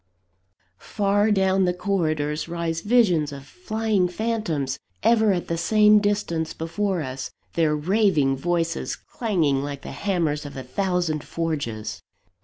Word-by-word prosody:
Far 205 0 +1
down 190 -2 +3
the 180 0 0
corridors 155 -6 -1
rise 165 -1 -2
visions 190 -10 +3
of 140 -1 -9
flying 220 - -1
phantoms, 180 - -2 0.2
ever 220 -2 +4
at 180 -2 -1
the 165 0 -2
same 210 +3 +5
distance 205 -6 -1
before 175 +2 -1
us 130 -1 -5 0.2
their 160 -2 +2
raving 160 -4 +2
voices 165 +3 -1
clanging 165 - 0
like 140 -1 -5
the - - -7
hammers 165 -7 -1
of 145 -2 -8
a 130 - -5
thousand 175 +2 -1
forges. 145 -10 -3
170 Hz, 130 wpm, -24 LUFS, 150-205 Hz, 0.2 s, same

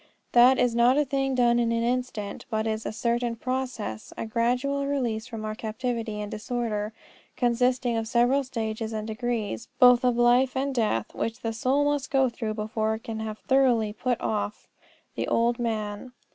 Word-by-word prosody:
That 245 +2 +6
is 245 -2 +2
not 240 +3 +4
a 295 - +3
thing 270 0 0
done 240 -1 +3
in 230 -1 +1
an 230 0 0
instant, 240 -4 -2
but 220 -1 -1
is 220 0 -2
a - - -2
certain 235 +1 -1
process, 255 - -4
a - - -3
gradual 250 +5 0
release 240 -5 -1
from 225 -3 -6
our 215 - -3
captivity 225 0 -3
and 210 - -5
disorder, 215 -2 -2 0.5
consisting 245 0 +1
of 225 0 -2
several 245 +4 +3
stages 225 -3 -4
and 215 -1 -3
degrees, 220 - -3
both 250 -1 +7
of 250 -1 +2
life 245 +2 +4
and 275 +1 -1
death, 215 - 0
which 230 +3 -3
the 225 -2 -2
soul 260 +5 +1
must 290 -2 0
go 265 -2 +3
through 225 -2 -4
before 220 0 -1
it 220 - -10
can 225 -1 -5
have 220 -1 -4
thoroughly 245 -6 +2
put 245 +2 -1
off 210 -1 -3 0.5
the - - -3
old 235 +1 +1
man. 220 0 -3
235 Hz, 180 wpm, -26 LUFS, 220-255 Hz, 0.5 s, both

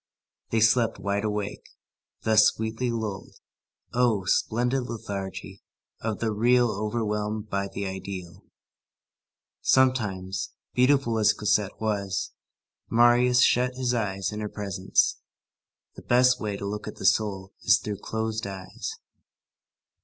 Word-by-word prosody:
They 115 - +1
slept 115 +1 +3
wide 100 0 -1
awake, 105 -1 -3 0.6
thus 110 -1 +6
sweetly 110 +3 -2
lulled. 110 -4 -4 0.6
Oh! 120 -6 +2
splendid 125 +7 +1
lethargy 95 -3 -6 0.4
of 110 -2 -2
the 115 -1 -1
real 120 +2 +3
overwhelmed 105 0 -2
by 100 0 -1
the 100 0 -5
ideal. 95 -2 -7 1.2
Sometimes, 95 -8 +1 0.2
beautiful 125 -3 +3
as 105 - +4
Cosette 105 -1 0
was, 100 -3 -2 0.6
Marius 120 +1 +5
shut 125 +1 +3
his 125 -1 0
eyes 95 -4 -1
in 105 - -5
her 105 -1 -3
presence. 100 -3 0 0.8
The - - -11
best 125 +1 +4
way 105 -2 -2
to 100 - -6
look 105 +1 -4
at 105 - -6
the - - -7
soul 95 -1 +1
is 90 - +5
through 105 +1 -5
closed 110 -1 -3
eyes. 95 -1 -6
105 Hz, 125 wpm, -26 LUFS, 100-120 Hz, 1.2 s, thus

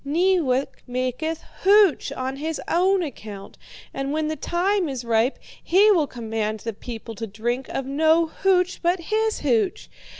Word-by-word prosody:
Neewak 300 -4 +1
maketh 255 +6 -2 0.2
hooch 400 -4 +4
on 260 +1 -4
his 315 +2 -3
own 370 +2 +2
account, 210 -9 -8 0.4
and 275 0 -3
when 310 0 -1
the 315 - -2
time 355 +3 0
is 255 -3 -5
ripe, 230 +3 +2 0.3
he 405 +5 +5
will 325 -7 +3
command 220 -3 -3
the 230 - -4
people 225 +1 -8
to 225 +1 -6
drink 240 +5 -3
of 270 - -3
no 315 +4 +3
hooch 365 +2 +1
but 350 +2 +1
his 435 +5 -1
hooch. 425 -6 0
305 Hz, 155 wpm, -23 LUFS, 245-360 Hz, 0.4 s, he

